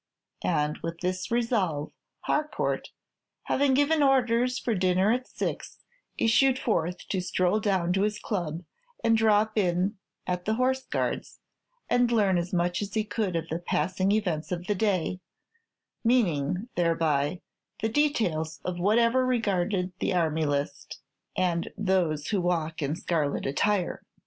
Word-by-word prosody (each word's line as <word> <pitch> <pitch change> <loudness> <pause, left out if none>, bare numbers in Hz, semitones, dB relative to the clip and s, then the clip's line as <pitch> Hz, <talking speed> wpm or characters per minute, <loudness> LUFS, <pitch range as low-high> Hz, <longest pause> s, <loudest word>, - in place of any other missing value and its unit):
And 150 0 0
with 165 0 -6
this 185 0 -2
resolve, 205 - 0 0.3
Harcourt, 305 0 -1 0.5
having 275 -1 +2
given 290 +3 +3
orders 250 -2 +3
for 235 - -1
dinner 185 +1 +2
at 255 +2 -1
six, - - -4 0.4
issued 260 +3 +4
forth 180 -9 -1
to 190 - 0
stroll 185 +3 +1
down 190 -5 +1
to 190 - +1
his 210 +1 0
club, 175 -6 -3 0.4
and 225 0 +4
drop 215 0 +3
in 185 +2 0 0.3
at 180 -1 -2
the 220 - +1
Horse 260 +2 +1
Guards, - - -3 0.5
and 245 -1 +2
learn 200 -6 +3
as 175 +1 -4
much 175 0 0
as 205 +1 -5
he 215 - +2
could 210 -4 -2
of 165 0 -2
the 165 - -2
passing 185 +2 0
events 180 -8 -1
of 175 0 -3
the 205 - +1
day, 185 -3 0 0.8
meaning, 185 - +1
thereby, 165 -2 +1 0.4
the - - +3
details 215 - 0
of 180 -1 -3
whatever 230 +6 +3
regarded 200 -6 0
the 190 - 0
army 160 -2 +1
list, 145 0 -3 0.4
and 175 -2 0
those 180 -7 0
who 200 -4 +1
walk 165 -2 -1
in 145 +1 -1
scarlet 160 -4 -1
attire. 185 +7 0
185 Hz, 145 wpm, -27 LUFS, 170-225 Hz, 0.8 s, issued